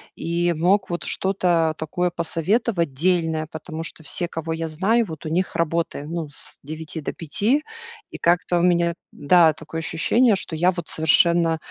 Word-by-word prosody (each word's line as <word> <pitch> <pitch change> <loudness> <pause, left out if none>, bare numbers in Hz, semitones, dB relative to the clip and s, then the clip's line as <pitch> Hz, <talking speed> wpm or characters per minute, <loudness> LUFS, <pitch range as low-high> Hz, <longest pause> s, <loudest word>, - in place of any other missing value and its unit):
и 170 +1 0
мог 180 +4 +1
вот 175 - -3
что-то 175 -4 +1
такое 175 +3 -1
посоветовать 170 - 0
дельное, 160 0 0
потому 160 +1 -6
что 165 0 -7
все, 175 +3 0
кого 165 -1 -4
я 165 0 -3
знаю, 205 +9 +1
вот, 160 -1 -9
у 155 - -3
них 180 +3 -1
работаем 165 -2 -2
ну 165 -4 -4
с 150 0 -12
9 155 +2 -7
до - - -3
5, 210 - 0 0.5
и - - -8
как-то 175 0 +2
у - - +1
меня, 170 -1 +2 0.2
да, 160 +2 +4
такое 160 +1 -7
ощущение, 210 +8 +2
что 170 -3 -4
я 175 +3 +3
вот 175 -3 -7
совершенно 165 +1 +4
170 Hz, 170 wpm, -22 LUFS, 160-180 Hz, 0.5 s, да